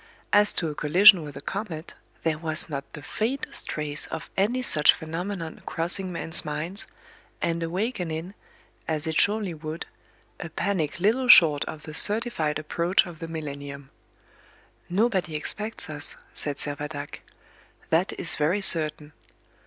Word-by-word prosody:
As 205 0 +5
to 165 - 0
a - - -4
collision 180 +6 +7
with 145 -3 -8
a - - -6
comet, 180 -2 -5 0.3
there 155 -2 0
was 160 -1 -1
not 140 -2 -5
the 150 - -9
faintest 235 - -2
trace 150 -1 -3
of - - -7
any 235 +7 +1
such 150 -10 +5
phenomenon 165 +1 -5
crossing 180 +3 0
men's 165 -1 +3
minds, 155 +7 -4 0.5
and 170 0 -1
awakening, 175 -1 -3 0.5
as 155 -1 -1
it 160 -1 +2
surely 205 -3 +1
would, 155 +1 -6 0.5
a 165 - -6
panic 170 -2 -2
little 230 +7 +2
short 155 -10 +8
of 155 -1 -8
the 155 - -8
certified 205 -6 +3
approach 170 +4 +1
of 170 -3 -10
the 165 - -6
millennium. 140 -3 -7 1.0
"Nobody 190 -4 +1
expects 210 +8 -4
us," 150 -1 -6 0.2
said 145 -2 -3
Servadac; 145 0 -5 0.7
"that 170 +4 +2
is 165 - +2
very 155 +7 +1
certain." 155 -4 +1
165 Hz, 140 wpm, -26 LUFS, 150-195 Hz, 1.0 s, short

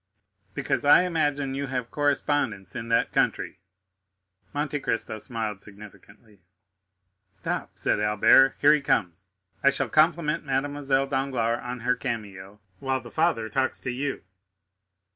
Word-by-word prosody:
"Because - - -1
I 145 +5 +7
imagine 145 -6 0
you 140 +1 -3
have 125 -3 -4
correspondents 145 -9 -1
in 115 - -5
that 115 0 +2
country." - - 0 0.9
Monte 145 0 -2
Cristo 115 -4 -3
smiled 110 -4 -4
significantly. 105 0 -15 0.9
"Stop," - - -5
said - - 0
Albert, 105 +6 +5
"here 145 +1 +6
he 150 - +2
comes. 95 -7 -1 0.3
I 140 - +7
shall 140 - -1
compliment 155 -1 +2
Mademoiselle 135 0 0
Danglars 130 -4 -1
on 125 0 -6
her 125 +2 +1
cameo, 105 -6 -6 0.2
while 130 +2 -1
the 120 -1 -12
father 115 -1 +1
talks 130 +2 -1
to 125 - -3
you." 135 0 -3
130 Hz, 130 wpm, -26 LUFS, 110-145 Hz, 0.9 s, I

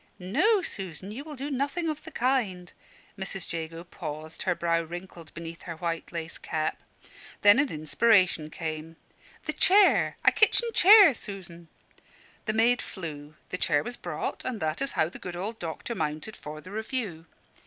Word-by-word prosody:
"No, 370 - +2
Susan, 190 - -5
you 255 +6 -6
will 305 -1 -8
do 280 +2 -5
nothing 285 +6 -1
of 305 -1 -4
the - - -7
kind." 225 - 0 0.5
Mrs. 190 -2 -4
Jago 165 0 -5
paused, 155 -3 -7
her 185 -2 +1
brow 170 -1 +1
wrinkled 170 0 -9
beneath 165 0 -7
her 165 - -4
white 165 -1 -3
lace 165 -1 -5
cap. 155 -1 -2 0.6
Then 205 +5 +7
an 285 -1 +2
inspiration 170 0 +3
came 160 -1 -5 0.5
"The - - -2
chair 400 +2 +5
a - - +8
kitchen 465 +2 +4
chair, 400 -4 +9
Susan!" 180 -6 -9 0.8
The 215 - 0
maid 235 +3 +3
flew; 155 -5 -7
the 180 - -4
chair 145 -1 +2
was 245 - -4
brought; - - -4
and 250 -4 -3
that 155 +4 -2
is 275 - -1
how 155 - +2
the 175 - -10
good 180 -1 -6
old 210 +6 -4
doctor 165 +7 -5
mounted 155 +3 -3
for 155 +1 -8
the 185 - -12
review. 210 -6 -4
180 Hz, 165 wpm, -28 LUFS, 165-245 Hz, 0.8 s, chair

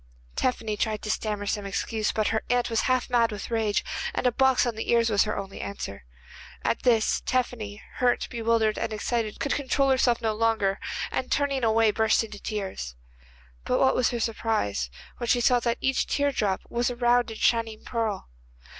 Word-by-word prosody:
Tephany 225 -4 -1
tried 215 -2 -1
to 210 - -1
stammer 210 -2 -2
some 205 0 -2
excuse, 215 +2 -1
but 215 -1 0
her 220 -1 0
aunt 245 0 +1
was 225 - +2
half 255 -1 +2
mad 235 -2 +2
with 210 +2 -6
rage, 220 -3 +1 0.3
and - - -1
a 250 - +5
box 265 +1 +3
on 240 - -1
the 220 - -5
ears 230 -1 +3
was 205 0 +4
her 210 - -2
only 195 -1 -6
answer. 100 - -6 0.6
At - - +1
this 230 -3 +3
Tephany, 230 -5 -2
hurt, 245 -1 +2
bewildered 230 -2 +1
and - - -2
excited, 215 0 -2
could 280 - 0
control 275 0 +1
herself 250 -2 +3
no 225 -2 0
longer, 215 -3 +1 0.3
and 255 - -3
turning 280 -3 +1
away 225 -1 +4
burst 220 +1 +2
into 210 -2 -8
tears. 190 - -4 0.7
But - - +1
what 265 - +4
was 250 - +2
her 240 - -3
surprise 215 - -1 0.3
when 240 - -3
she 245 - +3
saw 245 +1 +4
that 235 -1 -1
each 265 0 +1
tear 285 0 +1
drop 200 -7 0
was 240 +1 0
a 245 - -4
round 240 0 +3
and 220 - -8
shining 225 -2 +1
pearl. 225 -5 -2
225 Hz, 190 wpm, -26 LUFS, 215-245 Hz, 0.7 s, a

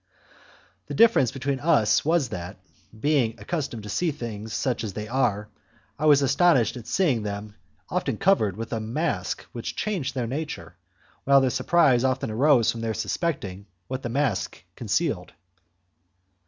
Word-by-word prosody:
The - - -5
difference 225 - +5
between 135 0 -2
us 120 -8 +3
was 160 -5 +2
that, 90 -1 -6 0.4
being 135 -5 +2
accustomed 120 0 -4
to 105 - -8
see 175 - 0
things 110 -6 -6
such 125 +1 -1
as 105 -4 -4
they 105 +1 -5
are, 110 -4 0 0.5
I 155 - +1
was 145 -2 +6
astonished 135 - +3
at 120 -3 -9
seeing 150 - +1
them 105 0 -5 0.3
often - - -2
covered 110 - +2
with 115 +1 -5
a 115 - -1
mask 110 - -2
which 120 - -5
changed 185 -12 -2
their 125 -2 -1
nature, 145 +6 -5 0.5
while 140 0 +6
their 130 -1 +2
surprise 130 -1 +3
often 130 -3 0
arose 125 0 +4
from 115 - -6
their 110 -1 -2
suspecting 105 - -3 0.2
what 130 0 -3
the 120 - -4
mask 135 -5 -1
concealed. - - -1
125 Hz, 155 wpm, -25 LUFS, 110-145 Hz, 0.5 s, was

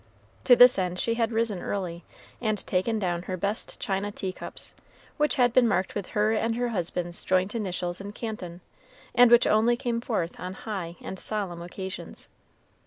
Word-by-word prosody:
To 245 - +8
this 245 -2 +8
end 180 -1 -1
she 230 - +1
had 230 0 0
risen 225 -5 0
early, 175 -4 -3 0.4
and 215 -3 +1
taken 200 +5 0
down 175 -4 -1
her 185 +1 -4
best 200 +4 -3
china 200 +1 -2
tea 190 -2 -3
cups, - - -8 0.4
which 300 0 +2
had 245 -3 +3
been 250 -2 +5
marked 190 -3 0
with 200 -3 -4
her 215 +1 +3
and 225 +1 0
her 245 0 0
husband's 175 -3 -2
joint 185 +2 +1
initials 185 -5 -3
in 200 +1 -6
Canton, 200 -6 -6 0.5
and 245 0 +7
which 240 0 +7
only 230 +3 +3
came 235 -2 -2
forth 185 -8 -2
on 185 +1 -5
high 190 -6 -5
and 190 - -6
solemn 195 -6 -3
occasions. 185 +2 -7
205 Hz, 175 wpm, -27 LUFS, 180-230 Hz, 0.5 s, To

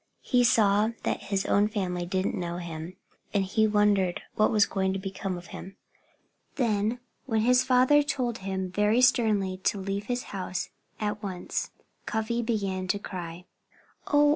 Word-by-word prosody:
He 250 -2 +3
saw 210 -2 +4
that - - -1
his 195 -1 -2
own 205 +1 +3
family 180 -4 -2
didn't 185 +1 0
know 175 -1 -3
him. 170 0 -6 0.4
And 195 -1 +3
he 220 +3 +2
wondered 205 -4 +2
what 215 - +3
was 210 -2 +4
going 190 -1 -1
to - - -1
become 190 -1 -4
of 175 - -10
him. 195 - -8 0.8
Then, 225 -2 0 0.3
when 225 -3 +1
his 250 +2 +4
father 260 +3 +5
told 250 -5 -2
him 190 -1 -3
very 210 +5 +3
sternly 215 -7 +3
to 200 - +2
leave 195 +1 -3
his 245 0 -1
house 185 -2 -3 0.3
at 210 0 -2
once, 185 -4 -3 0.4
Cuffy 235 +1 -1
began 200 -5 -1
to 205 - +1
cry. 180 -3 -7 0.6
"Oh! 290 0 +5
205 Hz, 160 wpm, -28 LUFS, 185-225 Hz, 0.8 s, father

